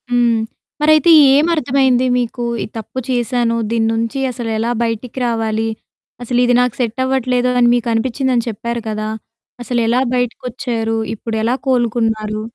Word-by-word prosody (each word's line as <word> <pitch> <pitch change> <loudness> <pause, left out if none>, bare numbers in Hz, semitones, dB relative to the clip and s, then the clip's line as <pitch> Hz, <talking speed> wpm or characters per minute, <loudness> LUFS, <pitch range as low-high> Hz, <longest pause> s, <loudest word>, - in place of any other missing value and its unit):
హ్మ్. 240 -2 +2 0.4
మరైతే 310 +2 +5 0.2
ఏమర్థమైంది 275 -4 +2
మీకు? 240 0 -3 0.2
ఈ - - -3
తప్పు 225 +4 -6
చేశాను. 240 -1 0
దీని 225 -1 +1
నుంచి 230 +4 -2
అసలెలా 230 -1 -2
బయటికి 230 +2 -4
రావాలి? 225 -1 -1 0.6
అసలిది 245 0 +2
నాకు 250 -2 0
సెట్టవ్వట్లేదు 250 +1 0
అని 240 - +5
మీకు 240 -1 -2
అనిపిచ్చిందని 245 +1 0
చెప్పారు 235 +2 -4
కదా! 215 0 -3 0.5
అసలెలా 240 +1 +1
బయటికొచ్చారు? 240 -2 -2 0.2
ఇప్పుడెలా 225 +2 -1
కోలుకున్నారు? 225 -4 0
240 Hz, 115 wpm, -17 LUFS, 225-250 Hz, 0.6 s, మరైతే